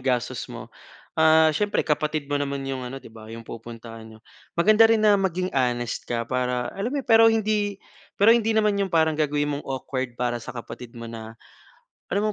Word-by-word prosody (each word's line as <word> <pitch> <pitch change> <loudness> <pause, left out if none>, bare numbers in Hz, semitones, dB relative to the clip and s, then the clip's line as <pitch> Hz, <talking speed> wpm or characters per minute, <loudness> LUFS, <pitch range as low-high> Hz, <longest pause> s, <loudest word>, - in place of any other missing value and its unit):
gastos 125 -3 -1
mo. - - -9 0.4
Ah, 160 0 +6
siyempre, 205 0 0
kapatid 150 -1 -1
mo 145 - -1
naman 140 -1 -2
‘yong 130 -1 -3
ano, 135 +2 -6
‘di - - -13
ba, 110 0 -12
‘yong 115 0 -9
pupuntahan 115 -1 -9
niyo. 110 - -15 0.4
Maganda 215 +5 +6
rin 225 - +4
na 205 - +6
maging 185 -2 -1
honest 120 -3 0
ka 115 -1 -3
para 125 -1 -1
alam 205 +5 -3
mo 285 - -1
‘yon. 265 - -9
Pero 225 -1 +7
hindi 210 -2 0 0.4
pero 205 - +6
hindi 225 -1 +1
naman 215 -2 +2
‘yong 200 -2 -1
parang 160 -2 +3
gagawin 145 -1 0
mong 145 - -6
awkward 130 -2 -4
para 120 -1 0
sa 115 - -7
kapatid 120 0 -9
mo 115 - -7
na 115 -1 -8 0.8
alam 210 +2 +1
140 Hz, 195 wpm, -24 LUFS, 120-200 Hz, 0.8 s, Pero